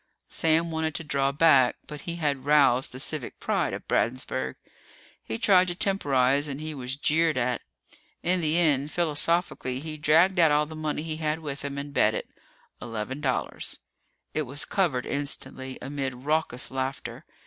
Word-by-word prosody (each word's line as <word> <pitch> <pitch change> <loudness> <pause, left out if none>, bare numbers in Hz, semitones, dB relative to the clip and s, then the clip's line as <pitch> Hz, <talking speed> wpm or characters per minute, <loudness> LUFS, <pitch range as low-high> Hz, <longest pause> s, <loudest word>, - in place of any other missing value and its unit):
Sam 165 +1 +2
wanted 160 -1 -1
to 165 - -2
draw 140 -2 +1
back, 140 -4 +5
but 150 -1 -8
he 170 - -3
had 145 -5 -1
roused 140 -3 +4
the 130 - -8
civic 145 -1 -3
pride - - 0
of - - -7
Bradensburg. 65 - -1 0.7
He 110 - -4
tried 185 - +5
to 175 - -2
temporize 145 -8 +2
and 140 -1 -5
he 155 0 -5
was 130 -2 -4
jeered 155 +1 +2
at. 125 0 0 0.6
In 180 +1 +1
the 155 +1 +1
end, 150 -4 +2
philosophically, 165 -5 0
he 155 +1 -6
dragged 160 +5 +4
out 165 -2 +6
all 150 +1 +3
the 160 +1 -9
money 155 -1 -2
he 160 -1 -4
had 155 -1 -1
with 145 -4 -6
him 140 0 -4
and 140 0 -6
bet 110 -5 +3
it - - -4 0.5
eleven 115 +5 -5
dollars. 130 -4 -2 0.6
It 155 -3 -1
was 140 +2 -2
covered 165 -11 0
instantly, 135 -2 -3
amid 135 -1 -3
raucous 150 -4 0
laughter. 130 +1 -4
145 Hz, 170 wpm, -27 LUFS, 130-160 Hz, 0.7 s, out